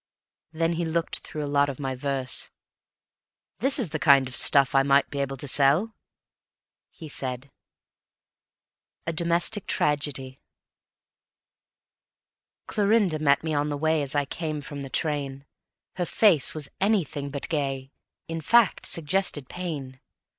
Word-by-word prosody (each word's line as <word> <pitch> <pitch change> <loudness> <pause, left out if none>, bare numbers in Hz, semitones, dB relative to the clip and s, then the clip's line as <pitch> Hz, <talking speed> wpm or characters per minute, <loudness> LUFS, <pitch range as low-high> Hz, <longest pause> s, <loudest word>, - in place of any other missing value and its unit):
Then 165 +1 0
he 170 +1 -2
looked 165 0 0
through 150 - -6
a - - -2
lot 140 0 +3
of 140 - -7
my 135 -2 -3
verse: 130 -1 0 1.1
"This 270 +5 +2
is 225 - -2
the 155 - -3
kind 140 -3 +5
of 125 - -7
stuff 140 +2 +5
I 135 - +5
might 140 0 +2
be 140 - -4
able 135 -1 -2
to 145 - -8
sell," 145 - +2 1.0
he 160 - -11
said: 130 -1 -4 1.5
A 165 - -2
Domestic 170 +5 +1
Tragedy 140 -3 -1 2.3
Clorinda 205 -6 +1
met 140 -1 +2
me 160 -1 -2
on 145 0 0
the 145 - -3
way 160 +1 +1
As 140 0 0
I 145 -1 +1
came 155 +1 -4
from 145 0 -7
the 135 - -7
train; 140 -2 -2 0.5
Her 180 - 0
face 185 -11 +3
was 150 -3 -5
anything 175 -9 0
but 140 0 -5
gay, 135 -3 -3 0.4
In 165 0 -4
fact, 230 +4 +3
suggested 165 -4 0
pain. 145 -8 -6
145 Hz, 140 wpm, -25 LUFS, 140-165 Hz, 2.3 s, kind